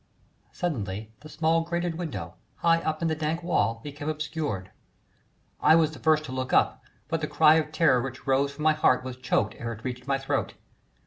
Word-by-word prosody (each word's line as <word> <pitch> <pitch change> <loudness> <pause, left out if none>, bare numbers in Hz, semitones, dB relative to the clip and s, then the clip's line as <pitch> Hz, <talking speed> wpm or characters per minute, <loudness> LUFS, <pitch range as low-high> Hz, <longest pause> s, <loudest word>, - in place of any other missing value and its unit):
Suddenly 110 - -4
the 155 - -12
small 165 +1 +2
grated 170 +1 -2
window 165 -2 -5 0.2
high 165 0 +3
up 155 0 -2
in - - +2
the 160 - +1
dank 160 +2 -2
wall 115 -10 +1
became 145 +1 -5
obscured. 150 - -3 0.9
I 160 - +6
was 160 -2 +3
the 155 - -11
first 155 -1 +3
to 130 - -7
look 130 0 -3
up, - - +2 0.2
but 165 +1 -2
the 150 - -1
cry 155 0 +5
of 155 -1 -1
terror 150 -6 +3
which 130 +1 -7
rose 135 +1 +2
from 150 - -7
my 155 0 +5
heart 130 -4 +3
was 130 -1 -6
choked 120 -4 0
ere 115 0 -3
it 110 +1 -12
reached 125 0 -5
my 135 -1 +2
throat. 135 0 -2
150 Hz, 200 wpm, -27 LUFS, 130-160 Hz, 0.9 s, I